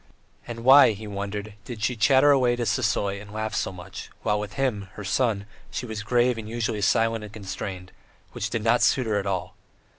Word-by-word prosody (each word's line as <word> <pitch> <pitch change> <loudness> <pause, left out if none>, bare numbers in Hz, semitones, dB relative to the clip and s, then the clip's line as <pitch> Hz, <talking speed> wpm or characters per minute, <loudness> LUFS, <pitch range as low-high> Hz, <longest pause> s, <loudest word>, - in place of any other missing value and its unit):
And 115 -1 -6
why, 135 -2 +8
he 105 +2 -9
wondered, 100 +1 -5
did 115 -3 -7
she 125 - +1
chatter 135 +5 +5
away 125 -3 +3
to 120 -1 -2
Sisoy 100 -4 0
and 105 -1 -12
laugh 110 0 -3
so - - -1
much; 95 +1 -9
while 105 0 +1
with 105 0 -6
him, 110 -8 -1
her 105 - -8
son, 105 0 0 0.2
she - - -4
was 110 -2 -5
grave 120 +2 +2
and 110 -1 -7
usually 115 -2 -2
silent 115 +2 +2
and 105 - -9
constrained, 95 -3 -6 0.4
which - - -3
did 115 - -2
not 115 +2 +3
suit 130 - +3
her 105 -2 +1
at 100 - -4
all. 95 -2 -2
110 Hz, 205 wpm, -25 LUFS, 100-120 Hz, 0.4 s, why